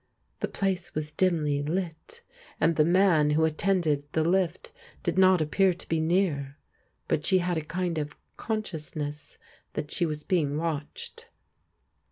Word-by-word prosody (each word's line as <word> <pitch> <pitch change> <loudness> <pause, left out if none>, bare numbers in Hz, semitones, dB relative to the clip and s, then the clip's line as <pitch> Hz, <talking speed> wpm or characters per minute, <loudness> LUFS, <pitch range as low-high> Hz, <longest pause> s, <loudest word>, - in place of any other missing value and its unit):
The - - -1
place 190 -3 -2
was 155 0 -2
dimly 155 -5 +1
lit, 180 - -4 0.4
and 165 +1 +3
the 150 - +5
man 170 -3 +4
who 155 +2 +3
attended 160 -2 +1
the 160 - +2
lift 180 0 0 0.3
did 175 - 0
not 185 -2 +5
appear 180 +4 +2
to 180 - -11
be 165 - 0
near, 160 -5 0 0.5
but 150 - 0
she 190 - +4
had 180 -1 0
a - - -7
kind 170 +1 -2
of 150 0 -5 0.2
consciousness 155 -8 -4 0.4
that 150 -1 -4
she 175 - +1
was 150 -1 -4
being 150 -6 +1
watched. 155 -2 -4
165 Hz, 150 wpm, -28 LUFS, 150-185 Hz, 0.5 s, the